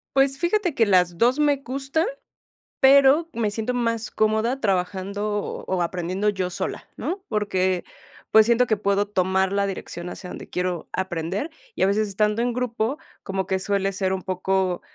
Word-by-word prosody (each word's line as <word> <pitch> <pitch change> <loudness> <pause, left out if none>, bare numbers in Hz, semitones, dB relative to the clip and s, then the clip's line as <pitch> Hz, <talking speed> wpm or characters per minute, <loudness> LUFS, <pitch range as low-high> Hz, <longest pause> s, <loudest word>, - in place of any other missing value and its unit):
Pues 270 0 +3
fíjate 355 -1 +1
que 230 - +3
las 180 -3 +3
2 245 +3 +4
me 290 -2 +3
gustan, 275 +4 -2 0.8
pero 280 +3 +6
me 225 -3 0
siento 225 +4 -2
más 230 -2 -1
cómoda 220 +4 +1
trabajando 200 0 -1 0.3
o 185 -2 0
aprendiendo 180 +4 -1
yo 190 -3 -2
sola, 180 - -5
¿no?, 380 +2 -3
porque, 190 -4 0 0.5
pues, 220 -1 +7
siento 240 +1 +4
que 220 - +2
puedo 200 0 +1
tomar 190 -1 +1
la 200 0 +1
dirección 180 -2 -6
hacia 180 0 -8
donde - - -8
quiero 180 -2 -2
aprender, 190 - -2 0.2
y - - -2
a - - +6
veces 210 +2 +1
estando 210 +2 +1
en 240 0 0
grupo, 245 +1 -1 0.3
como 190 -1 -3
que 190 0 0
suele 195 0 0
ser 190 0 0
un 190 - -4
poco, 185 -1 0
205 Hz, 170 wpm, -24 LUFS, 190-240 Hz, 0.8 s, pues